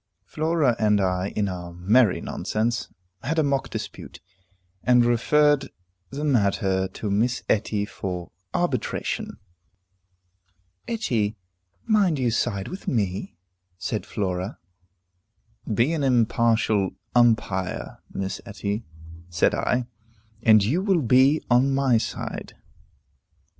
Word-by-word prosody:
Flora 155 -5 +1
and 105 -1 +3
I, 90 -1 0
in 105 -1 +1
our 90 -2 -5
merry 100 +5 +3
nonsense, 115 +2 -2 0.3
had 155 +8 -2
a 160 - +4
mock 140 -1 0
dispute, - - -7 0.6
and 125 -1 +5
referred 145 +4 +3 0.4
the 145 +2 -5
matter 100 -8 +1
to 105 +2 -5
Miss 120 +5 +1
Etty 105 -1 +1
for 90 -4 -6 0.2
arbitration. - - -2 1.5
"Etty, 115 - -1 0.5
mind 205 -8 +3
you 125 -3 +1
side 100 -4 -1
with 185 - -8
me," 100 -7 -2 0.4
said - - -3
Flora. 95 0 -3 1.1
"Be 115 +9 +2
an 155 -3 -1
impartial 115 -5 +2 0.2
umpire, 110 -6 +1
Miss 95 0 -4
Etty," 105 0 -4 0.5
said 85 -1 +2
I, 125 -1 0 0.6
"and 110 -3 +6
you 140 - +1
will 190 -6 +2
be 130 +6 +4
on 135 +3 +4
my 135 -4 +3
side." - - -5
115 Hz, 110 wpm, -24 LUFS, 100-135 Hz, 1.5 s, and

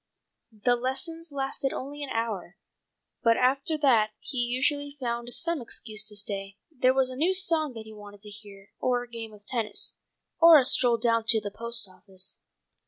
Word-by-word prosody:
The 245 - +4
lessons 270 +7 -2
lasted 270 -1 -1
only 285 +3 -6
an 285 - -4
hour, 215 -7 -3 0.6
but 230 0 +4
after 275 +5 +1
that 225 -6 +5
he 260 - -4
usually 285 +4 0
found 240 -1 -2
some 335 +1 +1
excuse 215 -2 -3
to 210 0 -3
stay: 200 -1 -3
there 255 -3 +3
was 260 -1 +2
a - - -5
new 340 +8 +2
song 325 -7 +1
that 220 -1 -8
he 220 - -11
wanted 205 -1 -12
to 210 - -10
hear, 205 -2 -11
or 245 -1 +1
a - - -12
game 230 -2 -7
of 210 -1 -16
tennis, 225 -4 -1 0.5
or 330 -1 +9
a 265 - +4
stroll 245 -2 +4
down 230 -1 +1
to 225 0 +5
the 205 -1 -6
post 235 0 -1
office. 190 0 -8
240 Hz, 180 wpm, -27 LUFS, 215-270 Hz, 0.6 s, or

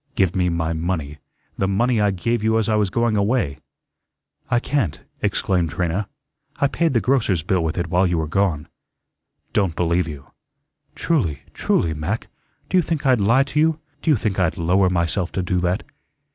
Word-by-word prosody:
"Give 95 -8 +2
me 90 -1 +2
my 85 -1 -1
money, 80 -3 -3 0.4
the 95 - +2
money 110 +4 +2
I 105 - +3
gave 110 +4 -1
you 110 0 +3
as 110 -2 +1
I 110 - +1
was 105 -2 +2
going 115 +2 +1
away." 100 - 0 0.9
"I 120 - +3
can't," 125 - -1 0.2
exclaimed 90 -4 0
Trina. 90 +4 -2 0.5
"I - - +1
paid 165 0 +1
the 115 - +3
grocer's 110 - +1
bill 90 -1 +1
with 80 +2 -2
it 85 - 0
while 90 +2 +2
you 85 -1 0
were 80 -1 -1
gone." 85 -4 0 0.9
"Don't 95 -5 +1
believe 85 0 +1
you." 70 -3 -9 0.6
"Truly, 90 - 0
truly, 80 - +1
Mac. 80 +9 -3 0.4
Do 185 - +1
you - - +6
think 160 -3 -3
I'd 130 -5 +4
lie 115 +7 +4
to 140 +2 -2
you? 160 0 +2 0.2
Do - - -1
you 150 - +6
think 100 -2 -2
I'd 90 -3 +1
lower 90 +3 +3
myself 90 +1 0
to 95 - -1
do 90 0 0
that?" 90 +1 0
95 Hz, 185 wpm, -22 LUFS, 85-115 Hz, 0.9 s, you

